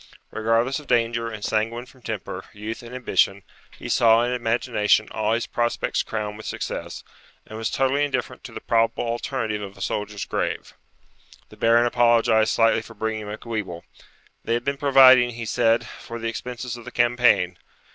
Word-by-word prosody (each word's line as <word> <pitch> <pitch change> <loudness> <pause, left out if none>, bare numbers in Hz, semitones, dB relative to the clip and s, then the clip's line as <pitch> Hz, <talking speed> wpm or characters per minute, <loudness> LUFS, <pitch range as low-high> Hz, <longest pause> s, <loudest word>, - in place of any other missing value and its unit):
Regardless 115 +5 +1
of 150 - -14
danger, 115 -1 +1
and 110 -2 -6
sanguine 115 +3 -1
from 130 0 -20
temper, - - -6
youth, 105 +2 -6
and 120 +1 -10
ambition, 100 -5 +1 0.3
he - - -8
saw 115 0 +4
in 120 - -1
imagination 115 -3 +1
all 110 0 0
his 115 0 0
prospects 120 0 -1
crowned 105 -1 -4
with 110 - -9
success, - - -5 0.4
and 110 - -10
was 115 - -1
totally 135 +2 +1
indifferent 145 - -3
to - - -9
the - - -8
probable 115 0 +1
alternative 115 -2 -2
of 100 -1 -8
a - - -12
soldier's 105 +1 -3
grave. - - -3 0.8
The - - -14
Baron 115 +1 +4
apologized 115 -2 +3
slightly 115 -1 +3
for 115 0 -13
bringing 110 0 -3
Macwheeble. 105 -5 -5 0.6
They 115 - 0
had 120 - -2
been 140 0 -1
providing, 130 -4 +6
he 115 -1 -5
said, 115 0 +2
for 115 +1 -9
the 115 0 -4
expenses 125 +2 -5
of 120 - -10
the 125 - -8
campaign. 120 -8 +2
115 Hz, 170 wpm, -23 LUFS, 110-120 Hz, 0.8 s, providing